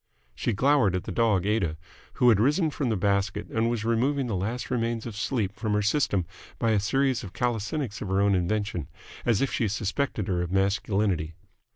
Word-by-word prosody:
She - - -1
glowered 125 -4 +3
at 90 - -2
the - - -6
dog 105 -6 +2
Aida, 100 -7 0 0.4
who 125 - +4
had 110 -4 +5
risen 150 - +2
from 140 -3 -2
the 110 - +1
basket 100 +1 0
and 115 +1 +1 0.2
removing 130 +4 +1
the 115 -5 -2
last 110 +8 -3
remains 115 -2 -1
of 115 -3 -6
sleep 105 -2 -1
from 110 0 -2
her 105 0 +1
system 100 - +1 0.3
by 115 -2 +1
a 105 - +3
series 135 +5 +1
of 95 -2 -8
calisthenics 120 0 -2
of 105 - -4
her 95 +1 +1
own 100 0 +3
invention, 95 -3 -1 0.4
as 115 -4 +3
if 135 - 0
she 115 - +1
suspected 105 +2 -2
her 90 -2 0
of 90 0 -3
masculinity. 95 -4 0
105 Hz, 195 wpm, -27 LUFS, 95-120 Hz, 0.4 s, had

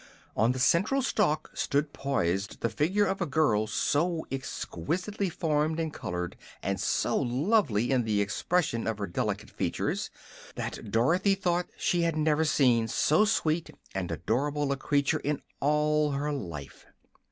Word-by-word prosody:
On 110 +4 +3
the 130 - -3
central 190 - +3
stalk 185 - +1
stood 145 +1 0
poised 100 -8 -1
the 115 - +1
figure 180 - +2
of 195 0 -2
a 175 - 0
girl 115 -8 +2
so 160 +9 0
exquisitely 180 - -3
formed 155 -2 0
and 160 -2 -2
colored 90 0 -4 0.3
and - - -1
so - - +1
lovely 125 - +1
in 130 -2 +3
the 105 -2 +1
expression 115 - 0
of 110 -2 -1
her 105 - -2
delicate 85 - -3
features - - -2 0.5
that - - -5
Dorothy 170 - +3
thought 180 -2 0
she 175 -2 +1
had 165 -1 +1
never 155 0 +2
seen 125 -7 +3
so 155 - +3
sweet 165 -6 0 0.2
and 95 -2 -3
adorable 140 - 0
a - - +2
creature 140 0 +1
in 145 0 -1 0.2
all 150 0 +2
her 145 +2 -1
life. 85 - -7
145 Hz, 150 wpm, -29 LUFS, 115-170 Hz, 0.5 s, On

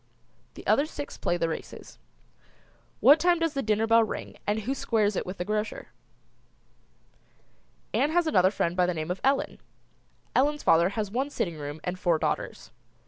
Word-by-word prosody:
The - - -11
other 290 - +3
six 290 -2 -7
play 175 - -1
the 165 -1 0
races. 160 - -8 1.0
What 285 +7 +7
time 350 +1 +3
does 330 -2 0
the 275 - -1
dinner 215 -1 +1
bell 230 0 +5
ring 215 - -5
and 210 +1 0
who 250 +6 -2
squares 215 -6 0
it - - -3
with 185 - -6
the 180 - -3
grocer? 210 +1 -3 2.0
Ann 290 - +2
has 345 +2 +2
another 185 - +4
friend 175 -3 -1
by 180 -1 +2
the 180 - -1
name 155 +2 -3
of 185 - -4
Ellen. 270 +1 +1 0.8
Ellen's 295 +2 +2
father 170 +2 +4
has 210 -2 -2
one 265 +5 -1
sitting 170 - -3
room 145 +1 -6
and 180 0 -4
four 170 -3 +2
daughters. - - -3
210 Hz, 175 wpm, -27 LUFS, 180-275 Hz, 2.0 s, What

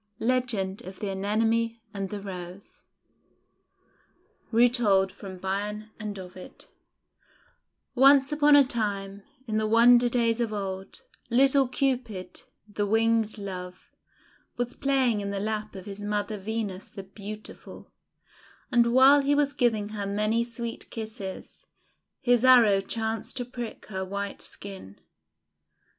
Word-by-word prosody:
LEGEND 225 -6 -1
OF 185 +1 -10
THE 205 -2 -3
ANEMONE 225 +4 0 0.2
AND 195 -1 -4
THE 210 - -5
ROSE 185 0 -9 1.7
Retold 225 -5 +3
from 190 -1 -10
Bion 205 +3 -4
and 210 -1 -5
Ovid 185 0 -11 1.3
ONCE 270 +2 +6
upon 295 0 +5
a 285 - +8
time, 205 -5 -3 0.2
in 215 -3 -2
the 215 - 0
wonder 240 +2 +6
days 235 -1 +1
of 230 -2 -1
old, 195 - -5 0.3
little 270 +2 +4
Cupid, 245 -7 -2 0.3
the 205 0 -2
Winged 225 0 +2
Love, 185 -3 -8 0.7
was 245 0 -2
playing 265 -6 +1
in 200 - -4
the 200 0 -3
lap 215 0 -3
of 190 -1 -8
his 200 0 -8
mother 210 0 -2
Venus 205 -2 -4
the 195 - -9
Beautiful, 205 +2 -10 0.8
and 235 -1 +3
while 270 +2 +7
he 285 +1 +2
was 285 -1 +1
giving 225 -6 +1
her 205 -2 -4
many 215 +3 +1
sweet 235 -1 -7
kisses, 215 -4 -8 0.5
his 245 -2 +3
arrow 235 -6 +6
chanced 220 +1 -3
to 245 - -2
prick 240 -2 -7
her 190 -3 -4
white 200 +1 -5
skin. 190 - -9
215 Hz, 125 wpm, -27 LUFS, 200-240 Hz, 1.7 s, a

